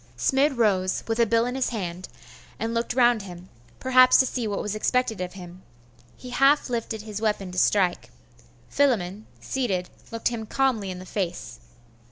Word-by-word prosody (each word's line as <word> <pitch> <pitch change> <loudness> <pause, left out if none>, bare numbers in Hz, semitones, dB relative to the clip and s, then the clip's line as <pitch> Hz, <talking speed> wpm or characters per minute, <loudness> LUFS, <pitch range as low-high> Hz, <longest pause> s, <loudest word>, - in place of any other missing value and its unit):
Smid 275 0 +2
rose, 190 -5 +1
with 225 +1 -1
a 235 - +4
bill 230 +1 +2
in 245 - -3
his 260 -1 0
hand, 185 -5 -5 0.5
and 225 +1 -3
looked 235 +1 -2
round 240 -3 +4
him 180 -1 -11 0.3
perhaps 255 -1 +6
to 260 - +5
see 245 -3 -3
what 205 -1 -2
was 210 - -3
expected 225 -1 0
of 180 -1 -4
him. 180 -1 -11 0.6
He 250 - -10
half 275 +1 +3
lifted 225 -2 -3
his 215 -1 -6
weapon 210 -4 -1
to 180 - -2
strike.... 185 -4 +2 0.6
Philammon, 215 -7 0
seated, 195 -9 -2 0.2
looked 230 +1 -1
him 225 -2 -5
calmly 245 -6 0
in 185 - -5
the 185 - -9
face.... 180 -2 -4
220 Hz, 175 wpm, -25 LUFS, 185-250 Hz, 0.6 s, perhaps